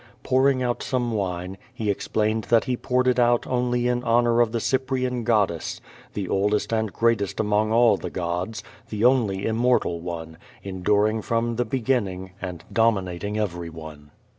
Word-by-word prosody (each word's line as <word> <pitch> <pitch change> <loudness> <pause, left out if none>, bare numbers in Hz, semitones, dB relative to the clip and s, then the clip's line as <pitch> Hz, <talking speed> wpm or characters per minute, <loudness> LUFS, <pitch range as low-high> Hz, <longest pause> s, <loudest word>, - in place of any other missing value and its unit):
Pouring 130 0 +2
out 120 -1 -1
some 125 -2 -1
wine, 95 -3 -3
he 110 -5 -1
explained 110 +2 -1
that 115 -1 +3
he 125 - -1
poured 125 +1 0
it 125 0 +3
out 120 0 +3
only 125 -1 0
in 125 0 0
honor 120 0 +3
of 115 -2 +2
the 115 - -1
Cyprian 130 0 -1
goddess, 105 -8 0 0.4
the 100 -3 -3
oldest 105 +4 0
and 110 -2 0
greatest 115 -3 0
among 105 0 +1
all 115 -2 +5
the - - -6
gods, 90 +6 -3 0.3
the 110 +1 -1
only 110 -7 +2
immortal 115 -6 +1
one, 80 -2 -7 0.2
enduring 105 +3 +1
from 115 +1 -1
the 120 - +1
beginning, 110 -7 -1
and 90 -3 -6
dominating 105 -3 0
over}'one. 80 -6 -5
110 Hz, 155 wpm, -24 LUFS, 95-120 Hz, 0.4 s, all